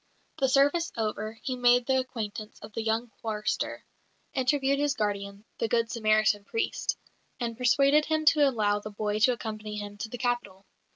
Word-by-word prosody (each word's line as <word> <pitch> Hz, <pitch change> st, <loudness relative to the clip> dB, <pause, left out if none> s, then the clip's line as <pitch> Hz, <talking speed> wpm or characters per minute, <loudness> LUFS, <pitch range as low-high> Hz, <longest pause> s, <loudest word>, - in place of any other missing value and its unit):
The 265 Hz, -1 st, +3 dB
service 285 Hz, +6 st, +3 dB
over, 215 Hz, -1 st, -2 dB
he 260 Hz, -, -2 dB
made 245 Hz, 0 st, +4 dB
the 265 Hz, 0 st, +2 dB
acquaintance 215 Hz, -4 st, -5 dB
of 210 Hz, 0 st, -10 dB
the 225 Hz, -, -2 dB
young 225 Hz, +1 st, -1 dB
chorister, 215 Hz, -1 st, -2 dB, 0.5 s
interviewed 270 Hz, +1 st, +1 dB
his 290 Hz, -1 st, +1 dB
guardian, 200 Hz, -2 st, -3 dB
the 230 Hz, -, +1 dB
"good 230 Hz, 0 st, +1 dB
Samaritan" 215 Hz, -2 st, +2 dB
priest, 450 Hz, -, -2 dB, 0.4 s
and 235 Hz, -2 st, -2 dB
persuaded 275 Hz, +5 st, +4 dB
him 310 Hz, 0 st, 0 dB
to 295 Hz, -3 st, +4 dB
allow 210 Hz, -4 st, +1 dB
the 215 Hz, -, -7 dB
boy 210 Hz, 0 st, -2 dB
to 250 Hz, +3 st, +5 dB
accompany 215 Hz, -2 st, -6 dB
him 205 Hz, 0 st, -6 dB
to 220 Hz, -, -4 dB
the 245 Hz, -, -6 dB
capital. 240 Hz, -6 st, -2 dB
230 Hz, 170 wpm, -28 LUFS, 215-260 Hz, 0.5 s, to